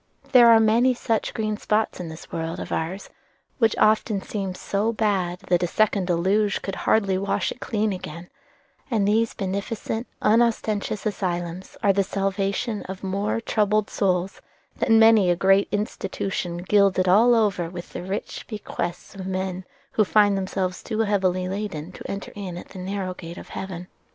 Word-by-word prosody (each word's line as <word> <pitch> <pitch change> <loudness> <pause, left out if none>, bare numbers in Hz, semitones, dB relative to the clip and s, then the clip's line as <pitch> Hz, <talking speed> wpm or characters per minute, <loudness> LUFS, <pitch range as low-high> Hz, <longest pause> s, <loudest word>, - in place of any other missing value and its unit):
There 240 -3 +8
are 225 -1 +8
many 235 +4 +4
such 225 -2 -1
green 215 -1 -2
spots 215 -1 0
in 175 -2 -5
this 160 0 -11
world 165 0 -3
of - - -6
ours, 175 +5 -3 0.5
which 225 -3 +3
often 215 -1 +3
seems 190 -2 -4
so 205 +3 0
bad 195 -5 0
that 175 -1 +1
a 175 - +1
second 200 -1 +1
Deluge 195 +4 +1
could 195 - -3
hardly 195 -2 +1
wash 200 +1 -1
it - - -8
clean 215 -3 -1
again; 170 -1 -7 0.6
and 215 -5 +1
these 225 +2 +2
beneficent, 205 +4 -3
unostentatious 215 -2 +1
asylums 180 -3 -3
are 200 -2 +5
the 200 0 +2
salvation 195 +3 -1
of 190 0 -7
more 200 +3 -1
troubled 215 -2 +1
souls 185 -1 0 0.3
than 225 -1 +3
many 225 -4 +6
a 175 - +4
great 195 +2 +4
institution 195 -4 -3
gilded 190 0 +3
all 225 +6 +6
over 200 -6 +1
with 175 0 -9
the - - -4
rich 190 +4 -5
bequests 195 -5 -5
of 190 -2 -7
men 185 -1 -3 0.3
who 215 - +3
find 205 0 +4
themselves 185 -1 -2
too 220 -1 -2
heavily 190 -4 +1
laden 190 -4 -4
to - - -9
enter 195 0 -5
in 190 -4 -6
at - - -10
the 190 - -10
narrow 190 0 -3
gate 170 -1 -9
of - - -10
heaven. 180 -2 -6
195 Hz, 165 wpm, -24 LUFS, 185-215 Hz, 0.6 s, There